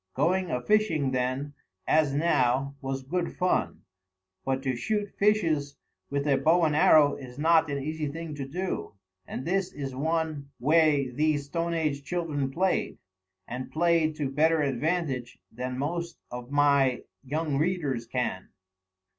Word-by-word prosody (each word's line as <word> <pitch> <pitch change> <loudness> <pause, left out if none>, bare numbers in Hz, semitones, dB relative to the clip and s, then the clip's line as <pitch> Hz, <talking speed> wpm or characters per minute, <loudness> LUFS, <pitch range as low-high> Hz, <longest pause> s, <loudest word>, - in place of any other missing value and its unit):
Going 180 +6 +1
a 125 - 0
fishing, 165 -10 +2
then, 130 +3 -1 0.3
as 155 -3 +3
now, 140 -3 +1
was 135 0 -3
good 170 +5 -2
fun; 180 0 0 0.6
but 135 0 -1
to 130 -2 0
shoot 205 - -2
fishes 160 -9 +2 0.3
with 140 0 -1
a 140 -2 +4
bow 165 +6 +3
and 155 -2 +2
arrow 150 -1 +6
is 125 -2 -10
not 160 +1 +4
an 140 - -1
easy 155 +2 -3
thing 160 +2 -6
to 140 -2 -5
do, 180 - -4 0.3
and 130 - -5
this 190 +1 0
is 135 -2 -5
one 155 0 -2
way 150 -1 +3
these 150 +2 +1
stone 170 +3 -2
age 150 -3 -1
children 150 -4 -2
played, 180 +7 0 0.5
and 125 +1 -5
played 165 -1 +2
to 145 -3 -2
better 155 +2 +3
advantage 140 -2 -1
than 125 +2 -4
most 170 +4 -3
of 125 0 -7
my 140 -3 +3 0.2
young 145 +1 -1
readers 150 -8 -1
can. 120 -6 -3
145 Hz, 145 wpm, -27 LUFS, 135-165 Hz, 0.6 s, arrow